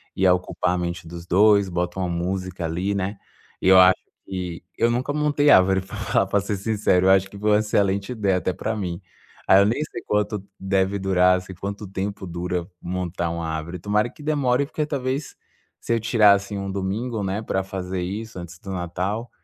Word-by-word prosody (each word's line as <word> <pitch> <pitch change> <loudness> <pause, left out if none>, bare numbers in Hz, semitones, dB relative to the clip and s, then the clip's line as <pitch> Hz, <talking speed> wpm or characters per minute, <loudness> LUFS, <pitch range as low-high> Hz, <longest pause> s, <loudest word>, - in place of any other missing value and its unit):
ia 95 -1 +4
ocupar 90 -1 -1
a - - -1
mente 85 -1 -4
dos 85 0 -8
dois, 100 +2 +5
bota 90 +1 -2
uma 90 - 0
música 90 +1 -3
ali, 90 +5 -1
né. 100 +1 -2 0.4
E - - 0
eu 95 - +8
acho 95 0 +7 0.3
que 90 -3 -5
eu 115 - +3
nunca 125 +4 -1
montei 150 -1 +2
árvore, 95 -4 +6
pra 100 +3 -9
falar 100 -1 +1
pra 100 +1 +2
ser 100 +1 -2
sincero. 100 -3 +2
Eu - - +7
acho 95 0 +4
que 100 - -11
foi 105 +1 +1
uma 105 - +5
excelente 100 0 0
ideia 100 -5 +1
até 90 +1 -1
pra 110 - -3
mim. 90 -3 -4 0.5
Aí 95 - +7
eu - - +4
nem 115 +8 +1
sei 135 -6 -7
quanto 105 0 0 0.2
deve 95 +1 +1
durar, 90 -1 +4
assim, 95 +1 -10
quanto 100 +3 -5
tempo 100 +1 -4
dura 90 0 -3 0.2
montar 90 -1 -3
uma 85 0 -3
árvore. 80 +2 -4
Tomara 105 +5 +1
que 150 - -14
demore, 140 -3 +1
porque 150 +1 -2
talvez 140 0 -3 0.5
se - - -1
eu 115 - +2
tirasse 105 -3 +4
um 100 0 -4
domingo, 105 +4 -2
né, 95 +2 -2
pra 95 -3 -1
fazer 95 -1 -4
isso 105 +3 -5
antes 85 +1 -9
do 95 - -8
Natal, 95 +6 -3
95 Hz, 200 wpm, -23 LUFS, 90-105 Hz, 0.5 s, eu